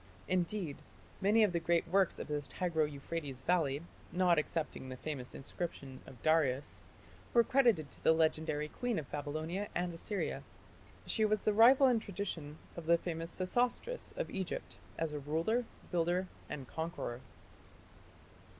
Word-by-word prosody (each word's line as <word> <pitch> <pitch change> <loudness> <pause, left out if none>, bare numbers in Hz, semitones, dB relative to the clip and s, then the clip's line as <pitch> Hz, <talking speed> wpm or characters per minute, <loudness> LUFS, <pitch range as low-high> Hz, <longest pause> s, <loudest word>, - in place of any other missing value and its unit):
Indeed, 180 -3 0 0.4
many 210 +3 +5
of 205 - +4
the 170 - +2
great 170 +1 +2
works 190 +1 +3
in - - -4
the 150 -1 -1
Tigro 160 0 0
Euphrates 140 -2 -5
valley, 155 -3 +1 0.3
not 180 -2 +4
excepting 150 -4 -3
the 130 - -6
famous 135 -3 -5
inscription 140 -2 -5
of 125 - -12
Darius, 150 -4 +2 0.6
were 235 - +8
credited 230 - +3
to - - -13
the - - +6
legendary 155 -2 +1
queen 245 +7 -2
of 150 -4 -5
Babylonia 155 +7 -3
and 175 0 0
Assyria. 195 +4 -2 0.6
She 220 - +1
was 215 -1 +2
the 215 - +4
rival 250 +6 +8
in 245 -3 +5
tradition 175 -7 -5 0.2
of 170 -2 -7
the 170 0 +6
famous 165 -1 -4
Sesostris 245 - 0
of - - -2
Egypt 190 -2 -4 0.2
as 160 -2 -1
a 150 - -2
ruler, 165 - 0 0.3
builder, 175 +1 +1 0.2
and 140 -4 -5
conqueror. 160 -7 -4
165 Hz, 150 wpm, -34 LUFS, 150-195 Hz, 0.6 s, were